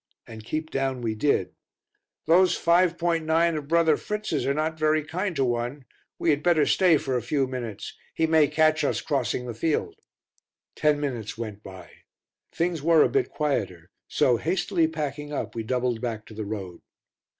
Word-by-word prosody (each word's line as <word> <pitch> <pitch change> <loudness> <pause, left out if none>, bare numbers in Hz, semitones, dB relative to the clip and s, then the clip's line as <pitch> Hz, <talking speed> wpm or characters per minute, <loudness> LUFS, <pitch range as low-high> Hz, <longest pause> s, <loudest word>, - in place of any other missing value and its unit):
And 110 -1 -10
keep 155 +7 -4
down 135 -2 -1
we 110 -1 -1
did. 105 -6 0 0.7
"Those 180 +2 +4
5.9 170 -1 +2
of 150 -2 -5
brother 165 -1 +3
Fritz's 210 -9 -3
are 140 - +2
not 155 +1 -2
very 155 0 +2
kind 175 +4 -3
to 135 -2 +1
one; 120 +3 -3 0.3
we 165 - +2
had 145 0 0
better 165 -4 +3
stay 180 -4 +4
for 135 -2 -3
a 125 - 0
few 135 +4 0
minutes; 120 -5 -6 0.2
he 160 - +2
may 160 -2 +4
catch 155 +1 +2
us 140 - 0
crossing 125 -3 -1
the 120 - -5
field." 150 +8 -1 0.8
Ten 150 -1 +2
minutes 120 -7 -4
went 110 -3 -6
by; 95 -4 -12 0.6
things 170 -2 -1
were 165 +1 +5
a - - +2
bit 405 -2 0
quieter, 100 - -2 0.2
so, 120 - +2
hastily 175 - 0
packing 150 -2 -5
up, 145 - -4
we 115 - -3
doubled 125 0 -1
back 110 -3 -4
to - - -13
the 110 0 -5
road. 100 -4 -6
145 Hz, 170 wpm, -25 LUFS, 120-160 Hz, 0.8 s, were